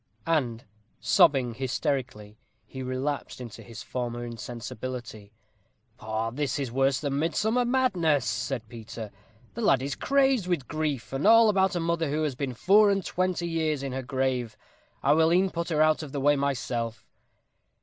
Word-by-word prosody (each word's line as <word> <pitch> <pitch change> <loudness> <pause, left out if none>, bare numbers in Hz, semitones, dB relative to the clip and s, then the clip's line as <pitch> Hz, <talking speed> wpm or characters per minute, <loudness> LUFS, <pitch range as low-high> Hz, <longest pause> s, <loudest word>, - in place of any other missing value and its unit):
And, 125 -8 0 0.3
sobbing 130 -4 +4
hysterically, 125 -4 -3 0.3
he 130 +4 -8
relapsed 130 +3 -3
into 120 -3 -9
his 115 -2 -10
former 120 -1 -4
insensibility. 120 -2 -7 0.7
"Poh! 110 +1 -2
this 145 +3 -2
is 135 -4 -3
worse 135 +1 +2
than 140 -1 -2
midsummer 215 +10 +1
madness," 185 - +2
said 110 +3 -3
Peter; 110 -2 -8 0.4
"the 235 - -5
lad 135 - +3
is 140 +1 -2
crazed 270 - +2
with 170 -8 -1
grief, 145 -7 -3
and 135 +8 +1
all 225 0 +7
about 190 -2 +2
a - - 0
mother 165 -2 0
who 155 +2 0
has 150 -3 -1
been 130 -1 -4
four 205 - +5
and 195 -2 0
twenty 180 -1 -1
years 160 -4 -1
in 135 - -3
her 130 +1 -3
grave. 125 -3 -2 0.5
I - - +5
will 160 +1 +4
e'en 185 +2 +3
put 170 +1 -3
her 155 -2 +3
out 155 0 +3
of 150 -3 -8
the 140 - -2
way 145 +2 +4
myself." 120 -5 -2
140 Hz, 165 wpm, -27 LUFS, 120-165 Hz, 0.7 s, all